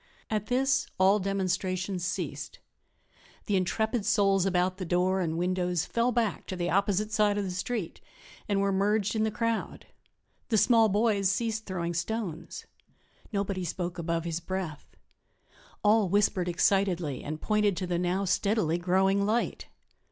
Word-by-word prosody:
At 215 -1 -1
this 265 +2 +1
all 195 +3 +4
demonstrations 185 -1 -1
ceased; 180 0 -4 0.9
the 205 - 0
intrepid 220 +4 0
souls 195 -2 +3
about 185 0 +1
the 190 - -4
door 185 +2 +1
and 165 -2 -1
windows 180 -1 0
fell 235 +1 +1
back 230 -3 -1
to 190 - -4
the 175 -1 -2
opposite 200 +2 +1
side 210 -1 +2
of 205 - 0
the 190 - -3
street 185 +1 -4 0.5
and 200 -1 +2
were 200 0 +1
merged 205 +2 +1
in 220 - +1
the - - +1
crowd; 230 +1 -2 0.6
the 220 - +3
small 225 0 +5
boys 205 -1 +2
ceased 220 +2 -1
throwing 175 -3 -2
stones. 185 -1 -4 0.7
Nobody 200 -2 -2
spoke 175 +1 -4
above 165 0 -1
his 165 -1 -3
breath; 175 -3 -6 0.9
all 210 -2 +4
whispered 190 -2 +2
excitedly 175 -5 +1
and 155 +1 -5
pointed 210 -2 +1
to 185 - -2
the 175 -1 -1
now 180 +2 0
steadily 185 -3 +1
growing 190 +3 +2
light. 220 +4 -1
195 Hz, 150 wpm, -28 LUFS, 180-210 Hz, 0.9 s, small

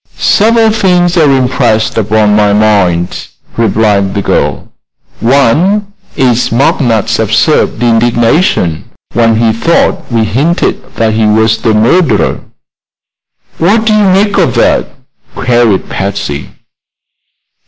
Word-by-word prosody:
"Several 225 +1 +2
things 180 -4 +1
are 160 -4 +3
impressed 125 -4 0
upon 105 -1 +1
my 105 -1 +2
mind," 100 -5 0 0.3
replied 105 -3 0
the 100 - -2
girl. - - -2 0.5
"One 160 - +1 0.2
is 125 -2 0
McNutt's 115 -3 0
absurd 120 - 0
indignation 115 - 0 0.3
when 115 -1 +2
he 110 0 +1
thought 130 +3 -1
we 115 -1 +1
hinted 140 - -2
that 110 -1 0
he 110 0 +1
was 110 +1 +1
the 110 -2 +1
murderer." 145 +10 +1 1.2
"What 215 +7 +1
do 220 - +2
you 210 -1 +2
make 200 +2 +1
of - - 0
that?" - - +1 0.5
queried 120 -5 0
Patsy. 95 -7 -4
115 Hz, 110 wpm, -9 LUFS, 110-170 Hz, 1.2 s, are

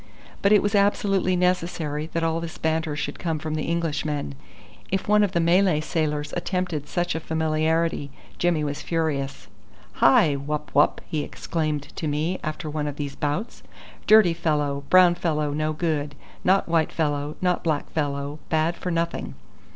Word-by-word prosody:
But 200 - +3
it 210 - +6
was 205 +1 0
absolutely 200 -2 +2
necessary 170 -4 0
that 165 - 0
all 165 0 +1
this 165 -1 -6
banter 160 -1 -1
should 150 - -4
come 165 -2 -1
from 155 0 -4
the 155 0 -2
Englishmen. 150 - -2 0.6
If 190 0 -1
one 210 0 +5
of 195 -2 0
the 170 - +2
Malay 175 0 +3
sailors 155 -2 -2
attempted 175 -4 -2
such 175 +1 -1
a 160 - -2
familiarity, 160 -1 0 0.3
Jimmy 175 -3 +2
was 145 -1 -3
furious. 140 -8 -2 0.6
"Hi 140 +2 +6
wup 150 +2 -4
wup!" - - +3
he 155 - -2
exclaimed 155 -2 -3
to 160 - -2
me 155 +5 -1
after 155 +2 -4
one 150 0 -2
of 145 - -4
these 145 -1 -5
bouts; 150 +10 -3 0.5
"dirty 215 -5 +7
fellow, 150 -4 -1
brown 185 -1 +7
fellow 155 -4 -1
no 155 +1 0
good. 150 -2 -2 0.3
Not 190 +2 +3
white 165 -2 +1
fellow, 145 -2 -1
not 180 -1 0
black 155 -3 0
fellow. 145 -1 -2
Bad 160 +2 +1
for 180 - -4
nothing." 170 0 -2
160 Hz, 165 wpm, -24 LUFS, 150-175 Hz, 0.6 s, dirty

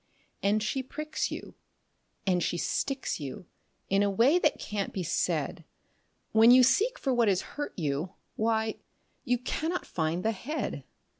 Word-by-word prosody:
And 205 +2 +2
she 265 +5 -1
pricks 305 +4 -3
you, - - -7 0.7
and 180 -2 +2
she 175 - 0
sticks 270 +7 -1
you, 145 +4 -6 0.4
in 195 +1 +3
a 205 - +3
way 240 - +4
that - - +2
can't 205 -2 -3
be 185 - -3
said 170 - -1 0.7
When 225 +1 +7
you 250 +1 +8
seek 450 - +3
for 270 - 0
what 240 -2 +3
has 190 -3 +3
hurt 290 0 -5
you, 155 +2 -2 0.2
why, 220 0 0 0.5
you 245 +1 +2
cannot 320 +8 -2
find 165 +2 -2
the 225 - +3
head. 270 +9 -4
220 Hz, 155 wpm, -29 LUFS, 185-265 Hz, 0.7 s, you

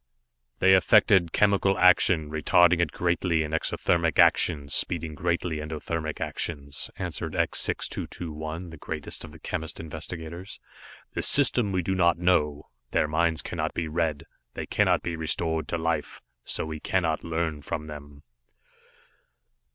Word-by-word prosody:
"They 95 0 +5
affect 100 +3 +5 0.2
chemical 100 -1 +2
action, 90 -4 +4
retarding 85 +3 +4
it 85 -3 +1
greatly 85 -2 0
in 75 - -5
exothermic 85 0 0
actions, 70 -3 +3
speeding 80 -2 -1
greatly 85 0 -1
endothermic 80 0 -4
actions," 70 -3 -4
answered - - -4
X - - +1
6221, 80 +1 -4
the 80 - -10
greatest 75 +1 -6
of - - -10
the 80 - -13
chemist 80 -1 -5
investigators. 80 +3 -7 0.5
"The - - -2
system 125 -6 +5
we 90 -2 0
do 95 - -1
not 85 -2 +3
know. 75 -4 +1 0.2
Their 75 - +1
minds 80 +1 0
cannot - - -3
be 85 - -2
read, 80 -2 -1 0.3
they - - -4
cannot - - +2
be 85 - -3
restored 80 -1 -1
to 85 - -2
life, 80 -2 -3 0.2
so - - -2
we 80 0 -6
cannot 80 -2 -1
learn 80 -2 -2
from 75 +1 -4
them." 75 -1 -11
80 Hz, 140 wpm, -26 LUFS, 75-85 Hz, 0.5 s, They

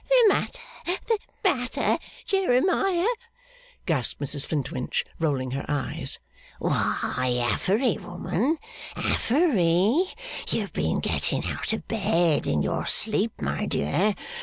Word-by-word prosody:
'The 410 - +2 0.5
the 450 -3 +1 0.2
matter, 255 -10 +1 0.3
Jeremiah?' 370 +1 +2 0.8
gasped 145 -9 0
Mrs 140 0 +1
Flintwinch, 140 -4 -2
rolling 135 -5 0
her 135 +2 -3
eyes. 145 -3 -2 0.4
'Why, 125 -1 0
Affery, 200 - +1
woman 225 - -1 0.4
Affery! 225 - +3 0.4
You - - +2
have - - -6
been - - 0
getting - - 0
out - - -2
of 220 - -3
bed 175 -8 +2
in 75 -1 +1
your - - -1
sleep, 215 0 +3
my 70 0 -1
dear! 190 - +1
195 Hz, 110 wpm, -26 LUFS, -, 0.8 s, Affery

